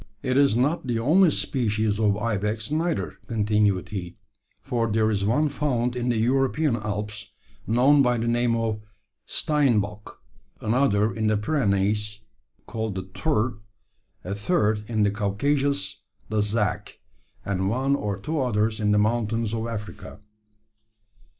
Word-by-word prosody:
"It 130 -2 0
is 140 -4 +4
not 135 +5 0
the 120 -2 0
only 165 +10 +4
species 110 -7 0
of 105 -2 +2
ibex 105 +1 -2
neither," 165 +1 -1
continued 105 -4 +1
he, 90 -4 -6 0.5
"for 115 -2 -1
there 110 0 +2
is 100 -2 0
one 145 +9 +2
found 125 -4 -1
in 125 0 -1
the 120 - +1
European 135 +4 +2
Alps, 105 -1 -5 0.4
known 130 +6 +5
by 125 -2 +2
the 115 +1 -2
name 120 0 +2
of 115 -2 -1 0.5
`steinboc;' 110 -9 0 0.5
another, 110 -2 +2
in 110 -1 -1
the 110 -1 +2
Pyrenees, 105 -4 0 0.5
called 110 -2 -4
the 95 - -3
`tur;' 115 +3 -1 0.6
a 95 - -4
third, 105 - +1
in 110 -2 +1
the 100 - +2
Caucasus, 105 +1 -1 0.3
the 110 0 0
`zac;' 105 0 -1 0.5
and 95 -1 -1
one 135 +5 +1
or 105 -7 -2
two 150 +8 -2
others 110 -3 0
in 105 -1 +1
the - - +3
mountains 110 0 0
of 115 0 -2
Africa. 105 -2 -7
110 Hz, 140 wpm, -25 LUFS, 105-125 Hz, 0.6 s, known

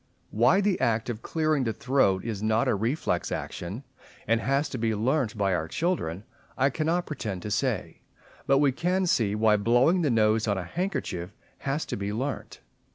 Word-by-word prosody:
Why 125 - +4
the 200 -2 +1
act 115 +1 +1
of 110 -1 -7
clearing 155 -3 0
the 115 -2 -1
throat 110 -9 +1
is 110 -4 -3
not 110 +1 +2
a - - +3
reflex 115 +9 -1
action, 95 +10 -5 0.4
and 115 +1 +2
has 140 +4 +1
to 130 - -5
be 110 -1 0
learnt 115 +1 0
by 100 -2 +1
our 80 -2 -1
children, 100 - -2 0.3
I 135 +1 +3
cannot 165 +5 0
pretend 105 - -5
to 105 - -5
say; - - -1 0.5
but 135 - +5
we 140 -1 +4
can 180 +7 0
see 110 - +1
why 105 0 +4
blowing 120 - +3
the 155 - +2
nose 110 -1 +2
on 100 - +1
a 95 - -3
handkerchief 95 - -3 0.2
has 140 +3 -2
to - - -4
be 100 0 -3
learnt. 130 +6 -4
115 Hz, 185 wpm, -27 LUFS, 105-145 Hz, 0.5 s, but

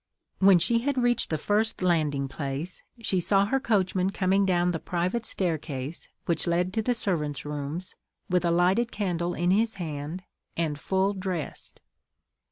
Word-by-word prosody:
When 190 -1 +7
she 230 +7 +2
had 275 +3 -1
reached 245 -1 +2
the 155 - 0
first 210 +4 0
landing 150 -6 +1
place, 140 +5 -5 0.2
she 190 -4 +1
saw 195 +3 +3
her 270 +6 +1
coachman 190 -5 +1
coming 195 0 +2
down 180 -1 +2
the 165 - -2
private 185 +9 -1
staircase, 155 -4 -3 0.2
which 170 0 0
led 175 +2 +1
to 220 - +1
the 245 +3 0
servants' 150 -10 -1
rooms, 150 +4 -4 0.3
with 180 -1 +1
a 170 - +2
lighted 185 +8 +2
candle 175 -4 -1
in 175 +1 +1
his 220 +2 +2
hand, 160 0 -5 0.3
and 155 -3 -1
full 190 +4 +1
dressed. 185 -6 -5
180 Hz, 160 wpm, -27 LUFS, 160-200 Hz, 0.3 s, When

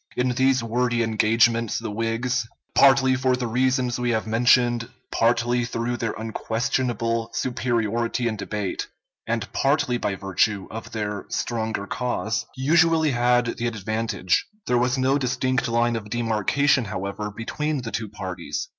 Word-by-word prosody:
In 125 +1 +2
these 130 0 +2
wordy 120 +1 +1
engagements 115 +1 +2
the 115 -2 -4
Whigs, 115 +2 -1 0.3
partly 135 -1 +5
for 130 -1 +2
the 125 -1 -3
reasons 125 +1 +1
we 120 0 0
have 110 -2 0
mentioned, 120 +1 +3 0.2
partly 120 +1 +2
through 120 +1 -2
their 115 -2 -2
unquestionable 115 +1 -1
superiority 120 -1 -1
in 110 - -1
debate, 100 -1 -3 0.4
and 115 0 -1
partly 135 -3 +1
by 100 - -1
virtue 95 +1 0
of 115 +1 -7
their 105 -2 -4
stronger 110 -3 -2
cause, 115 -3 -2
usually 160 +3 +3
had 120 -1 +2
the 120 - -1
advantage. 110 -3 -1 0.2
There 125 -1 +2
was 125 +2 +1
no 135 +2 +2
distinct 125 -1 0
line 120 0 +1
of 105 -2 -5
demarcation, 120 +4 +1
however, 100 +1 -4
between 135 +6 -3
the 115 - -5
two 110 -3 -3
parties. 95 -3 -5
120 Hz, 140 wpm, -24 LUFS, 110-125 Hz, 0.4 s, partly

